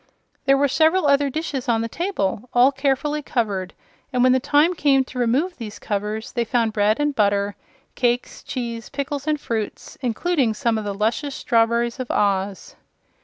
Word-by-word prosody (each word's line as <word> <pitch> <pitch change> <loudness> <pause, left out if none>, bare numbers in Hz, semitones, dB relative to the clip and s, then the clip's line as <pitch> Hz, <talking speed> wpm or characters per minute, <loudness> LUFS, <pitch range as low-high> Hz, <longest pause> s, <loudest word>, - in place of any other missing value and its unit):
There 275 0 +5
were 285 +1 +3
several 320 +5 +3
other 280 0 +3
dishes 275 -3 -3
on 225 -1 +2
the 230 - -2
table, 245 - -2
all 250 +3 +6
carefully 280 +2 0
covered, 205 -9 -2 0.4
and 250 -2 +2
when 255 - +5
the 260 - +4
time 290 +5 +3
came 280 -5 +3
to 255 -1 -8
remove 270 +10 +1
these 220 -3 -7
covers 210 +1 -3
they 235 - 0
found 230 -1 0
bread 210 +3 +2
and 295 0 +1
butter, 200 -3 +1 0.4
cakes, 245 0 -1
cheese, 235 -3 -5
pickles 280 +1 -4
and 305 -1 +1
fruits 225 -6 -5
including 255 -1 0
some 225 0 0
of 215 - -6
the 200 -1 -3
luscious 235 +7 -1
strawberries 235 +2 +1
of 255 - -4
Oz. 195 -1 -1
245 Hz, 170 wpm, -22 LUFS, 220-285 Hz, 0.4 s, all